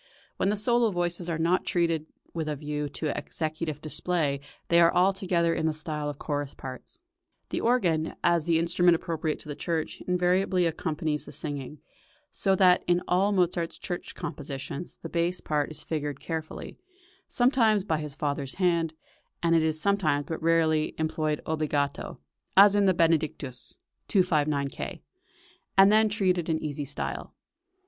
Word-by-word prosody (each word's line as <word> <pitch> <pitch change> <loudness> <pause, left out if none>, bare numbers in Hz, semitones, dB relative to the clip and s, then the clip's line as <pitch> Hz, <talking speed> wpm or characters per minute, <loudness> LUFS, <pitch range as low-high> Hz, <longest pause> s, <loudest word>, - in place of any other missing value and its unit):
When 190 - +1
the 210 - +1
solo 235 +2 +3
voices 175 -2 -2
are 165 - -1
not 170 +3 +2
treated 165 -3 0 0.3
with 160 -2 -2
a 150 - -1
view 150 0 -3
to 150 +1 -3
executive 155 -1 -4
display 155 -2 -1 0.3
they 170 - +5
are 170 - +6
altogether 180 -2 +2
in 160 - 0
the 160 - +1
style 150 -1 -3
of 145 - -6
chorus 145 -2 -3
parts. 130 - -9 0.5
The - - -2
organ, 175 -10 +1
as 170 -2 +3
the 170 -1 +3
instrument 170 +1 +4
appropriate 160 -2 -2
to - - -11
the 145 - -5
church, 165 0 -3
invariably 180 0 +2
accompanies 155 -2 -2
the - - -10
singing, 145 0 -6 0.5
so 195 -1 +2
that 180 -1 +5
in 175 0 +2
all 190 +3 +3
Mozart's 175 -3 0
church 175 - -6
compositions 145 -1 -6
the - - -3
bass 170 +1 0
part 150 -2 -1
is 155 - -8
carefully 160 - -1 0.7
figured, - - -11 0.5
sometimes 235 -5 +3
by 160 -6 0
his 150 -2 -6
father's 140 -3 -2
hand; 170 -4 +1 0.5
it 165 0 +3
is 160 -1 +2
sometimes, 160 -7 +1
but 160 +3 -5
rarely, 160 -1 +2
employed 155 -1 -1
obbligato, 150 -3 -2 0.4
as 200 +1 +9
in 205 -1 +3
the 185 - +4
Benedictus 155 -6 0 0.3
(259 155 -7 +2
K.), - - -7 0.7
and 195 +1 +8
then 215 0 +5
treated 185 -5 +1
in 160 - +2
easy 150 -2 -4
style. 140 - -4
165 Hz, 155 wpm, -27 LUFS, 150-180 Hz, 0.7 s, as